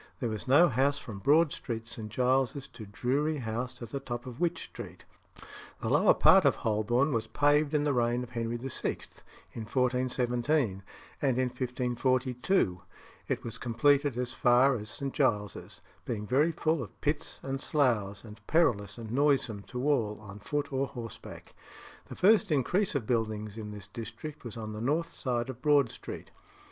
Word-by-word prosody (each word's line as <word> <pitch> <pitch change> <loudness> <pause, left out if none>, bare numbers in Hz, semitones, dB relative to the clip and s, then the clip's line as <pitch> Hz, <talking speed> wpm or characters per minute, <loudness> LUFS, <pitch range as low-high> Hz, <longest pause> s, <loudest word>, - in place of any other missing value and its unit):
There 120 - -1
was 110 +1 -5
no 145 +7 +7
house 135 +2 +2
from 110 -9 -7
Broad 150 +6 +4
Street, 115 -3 -4
St. 115 -2 -6
Giles's, 130 +3 +1
to 110 -4 -10
Drury 140 +9 0
House 120 0 -4
at 115 - -8
the 140 - -3
top 120 -3 -5
of 125 -1 -8
Wych 175 -1 +1
Street. - - -10 0.7
The - - -3
lower - - +5
part 190 -1 +6
of 140 - +4
Holborn 120 +6 +1
was 115 -1 -1
paved 145 +3 +2
in 145 - +2
the 145 -1 +1
reign 120 0 +1
of 125 - -10
Henry 115 -1 -2
VI., 130 +2 -2 0.6
in 115 - -6
1417; 125 -2 +1 0.4
and 130 -4 +2
in 130 -1 +1
1542 125 0 -1
(33d 185 - -4
Henry 90 - +2
VIII.) - - -20 0.5
it - - -2
was 115 - -6
completed 140 +3 +2
as 125 0 -2
far 125 +2 +4
as 105 -2 -6
St. 135 +4 -4
Giles's, 105 - -1 0.2
being 105 -3 -4
very 145 +9 +3
full 160 -2 0
of 115 - -9
pits 150 0 -2
and 135 0 -3
sloughs, 110 -9 +1
and 110 -1 -12
perilous 110 - +2
and 115 -2 -7
noisome 135 -6 +2
to 125 +3 -3
all 110 -8 +1
on 105 -1 -10
foot 145 +5 -3
or 135 +1 0
horseback. 115 -4 -9 0.5
The - - -8
first 210 0 +4
increase 175 +7 +1
of 130 -6 -1
buildings 110 -3 -1
in 110 -2 -6
this 105 -2 -8
district 115 +8 -8
was 120 -2 -7
on 110 -1 -5
the 105 - -6
north 155 +7 0
side 120 -2 -2
of 130 -1 -8
Broad 145 -4 +4
Street. - - -9
125 Hz, 180 wpm, -30 LUFS, 115-140 Hz, 0.7 s, no